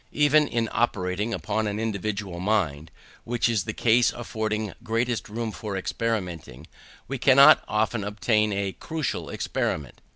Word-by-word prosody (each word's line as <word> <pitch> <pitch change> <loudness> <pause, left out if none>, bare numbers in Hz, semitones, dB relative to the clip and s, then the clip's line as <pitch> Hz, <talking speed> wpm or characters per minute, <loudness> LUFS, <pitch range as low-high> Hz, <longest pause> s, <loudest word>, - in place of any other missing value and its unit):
Even 150 0 +4
in 115 -1 -1
operating 105 -1 -1
upon 110 +3 -1
an 105 +1 -3
individual 105 -4 -3
mind, 85 -7 0 0.3
which 120 0 0
is 110 -6 0
the - - -2
case 120 +1 +3
affording 110 -3 -3
greatest 115 0 -1
room 115 +1 -3
for 105 -1 -5
experimenting, 90 - -3 0.4
we 135 -1 -4
cannot 140 +2 +7
often 110 0 0
obtain 105 +1 +1
a 100 -1 -1
crucial 160 - -4
experiment. 75 -5 -3
110 Hz, 135 wpm, -25 LUFS, 100-115 Hz, 0.4 s, cannot